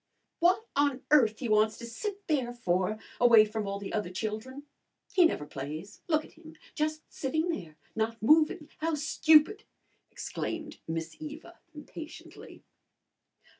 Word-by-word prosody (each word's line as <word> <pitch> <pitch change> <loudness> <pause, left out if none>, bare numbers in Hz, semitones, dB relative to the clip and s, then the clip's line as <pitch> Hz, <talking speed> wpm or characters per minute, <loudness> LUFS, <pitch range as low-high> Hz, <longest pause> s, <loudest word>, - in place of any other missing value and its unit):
"What 370 +6 +3
on 285 -2 +1
earth 230 -8 +5
he 250 - -4
wants 215 0 +3
to 235 - -8
sit 400 - -5
there 265 -6 0
for 190 -3 0 0.2
away 230 -3 +7
from 215 -1 -4
all 200 0 -2
the 200 -1 -7
other 210 -4 -1
children! 220 +8 -5 0.5
He 365 -3 +6
never 150 - 0
plays. 155 +9 -7
Look 310 -2 +1
at - - -16
him! 320 0 -15 0.2
Just 310 0 -1
sitting 315 +5 -1
there 165 - -5 0.2
not 225 +1 -1
moving. 305 +4 +4
How 320 0 0
stupid!" 310 +5 +4 0.5
exclaimed 310 -2 -5
Miss 165 0 -4
Eva 315 +3 -9 0.2
impatiently. 305 +1 -10
265 Hz, 140 wpm, -30 LUFS, 215-315 Hz, 0.5 s, away